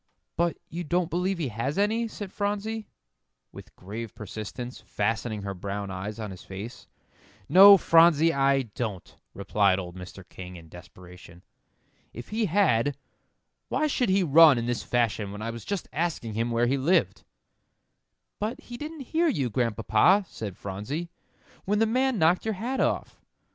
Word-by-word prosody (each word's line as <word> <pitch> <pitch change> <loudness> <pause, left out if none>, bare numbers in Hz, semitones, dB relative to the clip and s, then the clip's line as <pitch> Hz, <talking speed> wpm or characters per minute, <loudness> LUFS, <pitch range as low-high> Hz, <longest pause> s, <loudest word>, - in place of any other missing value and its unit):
"But 170 0 0
you 170 +2 -5
don't 175 +2 -1
believe 180 +2 0
he 155 -6 -2
has 120 - -3
any," 220 +3 +1
said 205 -3 -8
Phronsie, 210 +2 -3 0.6
with - - -13
grave 110 +4 -7
persistence, 110 +4 -7
fastening 110 0 -2
her 100 -1 -4
brown 100 +1 -5
eyes 95 +4 -6
on 105 -2 -5
his 95 - -10
face. 105 +6 -9 0.6
"No, 200 +2 +9
Phronsie, 165 -2 +5
I 135 0 +2
don't," 105 -5 -6 0.2
replied 100 -1 +2
old 90 -2 -6
Mr. 90 0 -10
King, 90 0 -10
in 80 -2 -13
desperation. 90 +1 -14 0.7
"If 120 - -9
he 220 0 0
had, 145 - +2 0.7
why 310 - +1
should 260 -6 0
he 190 0 +3
run 155 -3 +7
in 115 - -2
this 120 -1 -1
fashion 110 -4 -1
when 105 +1 -7
I 115 - -3
was 115 -1 -8
just 200 -4 -3
asking 155 -9 -2
him 115 +2 -1
where 120 +1 +1
he 135 +3 +1
lived?" 165 +8 +1 1.2
"But 225 +7 -3
he 245 -5 -9
didn't 305 +2 -7
hear 335 +2 +3
you, 135 - 0
Grandpapa," 115 - +2
said 105 -4 -7
Phronsie, 105 - -5 0.5
"when 210 +2 +1
the 225 - +3
man 255 +2 +1
knocked 170 +1 +3
your 220 -1 -2
hat 245 +7 -3
off." - - -1
130 Hz, 160 wpm, -27 LUFS, -, 1.2 s, No